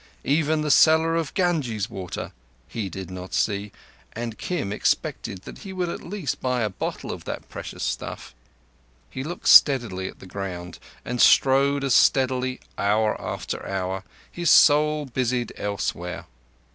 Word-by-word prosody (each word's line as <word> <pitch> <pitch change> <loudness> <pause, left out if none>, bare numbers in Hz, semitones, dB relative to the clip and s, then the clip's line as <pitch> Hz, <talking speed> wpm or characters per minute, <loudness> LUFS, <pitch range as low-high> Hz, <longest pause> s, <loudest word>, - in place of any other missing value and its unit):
Even 155 +2 +2
the 150 -1 0
seller 160 +2 +5
of 165 -4 -1
Ganges 145 - 0
water 95 -2 -6 0.4
he 105 -4 -4
did 95 +1 -7
not 90 0 -6
see, 100 -1 0 0.4
and 115 -1 -5
Kim 145 - -3
expected 95 - -1
that - - -10
he 195 - -8
would 180 -2 -2
at - - -5
least 185 -4 -4
buy 125 -1 0
a 105 -2 0
bottle 95 - -4
of - - -8
that - - -6
precious - - -7
stuff. - - -4 0.8
He 130 - -5
looked 175 +5 -5
steadily 115 -10 +6
at - - -9
the - - -13
ground, 90 -2 -6 0.3
and 125 0 -1
strode 140 +1 +5
as 135 -2 +2
steadily 130 -1 +3 0.2
hour 105 +2 +2
after - - -4
hour, 95 0 -3 0.3
his 175 -2 -1
soul 150 0 +5
busied 125 -2 -1
elsewhere. 90 -3 -4
125 Hz, 150 wpm, -24 LUFS, 100-150 Hz, 0.8 s, steadily